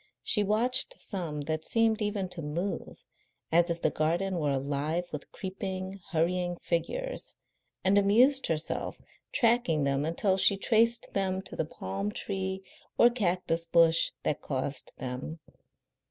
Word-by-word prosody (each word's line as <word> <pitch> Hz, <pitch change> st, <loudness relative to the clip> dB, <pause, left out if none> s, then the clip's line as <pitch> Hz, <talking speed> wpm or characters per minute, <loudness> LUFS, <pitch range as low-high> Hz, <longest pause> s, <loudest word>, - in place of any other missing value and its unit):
She 210 Hz, -, +3 dB
watched 235 Hz, -, +2 dB
some 165 Hz, -7 st, -4 dB
that 155 Hz, +2 st, -2 dB
seemed 225 Hz, +1 st, +2 dB
even 205 Hz, -2 st, -1 dB
to 180 Hz, -2 st, -6 dB
move, 165 Hz, +6 st, -4 dB, 0.5 s
as 170 Hz, +2 st, +4 dB
if 170 Hz, 0 st, -3 dB
the 155 Hz, -, +3 dB
garden 175 Hz, +4 st, 0 dB
were 150 Hz, -2 st, 0 dB
alive 140 Hz, +5 st, -1 dB
with 150 Hz, -, -7 dB
creeping, 190 Hz, 0 st, -5 dB
hurrying 175 Hz, +1 st, 0 dB
figures, -, -, -2 dB, 0.5 s
and 195 Hz, +2 st, +5 dB
amused 245 Hz, +8 st, +4 dB
herself 160 Hz, -1 st, -2 dB, 0.3 s
tracking 230 Hz, -, +2 dB
them 140 Hz, 0 st, +1 dB
until 185 Hz, +5 st, +2 dB
she 195 Hz, +1 st, +5 dB
traced 230 Hz, +3 st, +2 dB
them 190 Hz, -1 st, 0 dB
to -, -, -5 dB
the -, -, -1 dB
palm 100 Hz, -4 st, -4 dB
tree 190 Hz, -, -3 dB, 0.3 s
or 240 Hz, -, +6 dB
cactus 180 Hz, -6 st, 0 dB
bush 165 Hz, 0 st, +4 dB
that 150 Hz, -, -1 dB
caused 135 Hz, 0 st, -2 dB
them. 130 Hz, +5 st, -5 dB
180 Hz, 140 wpm, -29 LUFS, 155-200 Hz, 0.5 s, or